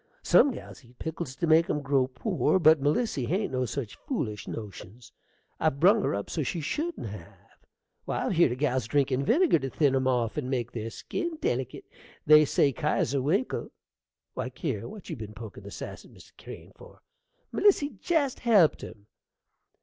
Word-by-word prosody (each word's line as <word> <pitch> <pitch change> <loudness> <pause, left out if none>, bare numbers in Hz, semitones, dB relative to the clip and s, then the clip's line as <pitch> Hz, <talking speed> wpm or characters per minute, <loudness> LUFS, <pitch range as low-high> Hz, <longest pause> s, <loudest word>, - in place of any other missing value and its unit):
Some 285 - +5
gals 240 - -9
eat 120 +1 -21
pickles 160 -4 -5
to 170 - -1
make 160 +1 +4
'em 150 -1 -1
grow 135 -2 +2
poor, 185 - 0
but 160 -4 +5
Melissy 145 - 0
hain't 190 - -1
no 130 -1 0
such 115 -4 -5
foolish 110 - -3
notions. 105 +2 -9 0.5
I've 155 -3 0
brung 205 +7 +5
her - - 0
up 100 - -4
so 160 - -3
she 150 +5 -2
shouldn't 310 - -3
have. 100 -6 -11 0.5
Why, - - -2
I've - - 0
heered 170 -7 +4
of - - -7
gals 130 -5 0
drinkin' 135 -1 +1
vinegar 330 - +3
to 135 -1 -4
thin 140 -1 +2
'em 130 0 +1
off 120 -2 0
and 135 -4 -2
make 120 -3 -2
their 115 -1 -5
skin 335 - -4
delekit. 130 - -2 0.4
They 155 0 +7
say 140 0 +2
Kesier 140 -1 0
Winkle 185 - -1 0.6
Why, - - -4
Kier, - - -4
what 210 -4 -11
be - - -6
you 110 -3 -6
pokin' 110 -3 -9
the 100 - -9
sass - - -8
at - - -17
Mr. - - -17
Crane - - -11
for? - - -16 0.5
Melissy 375 -8 +3
jest 300 -7 0
helped 210 -10 +4
him. 105 -2 -10
140 Hz, 180 wpm, -28 LUFS, 125-175 Hz, 0.6 s, They